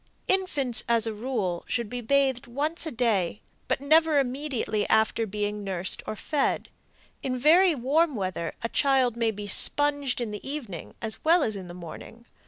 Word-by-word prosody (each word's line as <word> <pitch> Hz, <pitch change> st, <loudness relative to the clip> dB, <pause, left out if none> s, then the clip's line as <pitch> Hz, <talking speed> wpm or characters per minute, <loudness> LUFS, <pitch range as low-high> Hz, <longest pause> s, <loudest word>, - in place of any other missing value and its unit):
Infants, 290 Hz, -11 st, 0 dB
as 230 Hz, -1 st, +2 dB
a 225 Hz, -, -2 dB
rule, 210 Hz, -6 st, -3 dB
should 235 Hz, -2 st, -1 dB
be 245 Hz, +3 st, -5 dB
bathed 270 Hz, +1 st, +1 dB
once 300 Hz, +7 st, -3 dB
a -, -, -4 dB
day, 215 Hz, -6 st, 0 dB, 0.3 s
but -, -, 0 dB
never 310 Hz, +2 st, +3 dB
immediately 260 Hz, -5 st, -1 dB
after 220 Hz, +1 st, +2 dB
being 210 Hz, +1 st, -3 dB
nursed 185 Hz, -2 st, -3 dB
or -, -, -3 dB
fed. 285 Hz, +6 st, -1 dB, 0.5 s
In 255 Hz, -1 st, -2 dB
very 330 Hz, +6 st, +5 dB
warm 290 Hz, +4 st, +1 dB
weather 185 Hz, -5 st, -4 dB
a 230 Hz, -, -2 dB
child 265 Hz, -4 st, +2 dB
may 230 Hz, -1 st, 0 dB
be 210 Hz, -1 st, -6 dB
sponged 285 Hz, +5 st, +5 dB
in 235 Hz, -3 st, -3 dB
the 210 Hz, -, -6 dB
evening 260 Hz, -, -6 dB
as 220 Hz, -1 st, -1 dB
well 330 Hz, +1 st, +4 dB
as 215 Hz, -, -1 dB
in 190 Hz, -2 st, -7 dB
the 175 Hz, -, -10 dB
morning. 180 Hz, +7 st, -11 dB
240 Hz, 175 wpm, -26 LUFS, 210-285 Hz, 0.5 s, very